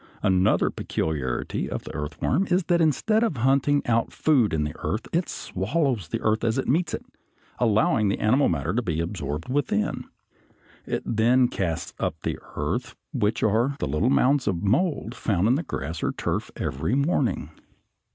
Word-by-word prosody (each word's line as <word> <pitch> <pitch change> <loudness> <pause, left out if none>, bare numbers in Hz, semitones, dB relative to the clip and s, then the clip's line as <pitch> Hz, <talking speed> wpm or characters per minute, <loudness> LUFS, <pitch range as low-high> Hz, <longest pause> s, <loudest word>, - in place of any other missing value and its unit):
Another 95 -1 +3
peculiarity 65 -5 -2
of - - -4
the - - -8
earthworm 80 - -1
is 180 +1 +2
that 170 0 +2
instead 190 - +2
of 195 - 0
hunting 135 +4 +2
out 115 -1 +1
food 135 -9 +2
in 80 -2 0
the 75 -1 -3
earth 110 - -2
it 170 +1 +1
swallows 120 - -1
the 115 - -3
earth 110 0 +1
as 115 +1 +1
it 135 - -1
meets 165 +6 +1
it, - - -9 0.5
allowing 110 -2 +3
the 100 - +1
animal 130 +6 +3
matter 80 +1 -1
to 120 - +1
be 85 -8 -2
absorbed 80 -3 -3
within. 130 -6 -1 0.8
It - - -2
then 120 +3 +3
casts 85 -8 -3
up - - -1
the - - -2 0.2
earth, 85 - -2 0.2
which 115 -4 0
are 115 +6 +2
the - - -2
little 75 - +1
mounds 135 -1 +3
of 95 -3 0
mold 125 - +1
found 100 -5 0
in 120 - +4
the 145 - +1
grass 80 - -5
or - - 0
turf - - -2
every 70 - -1
morning. 140 - 0
115 Hz, 170 wpm, -25 LUFS, 90-140 Hz, 0.8 s, in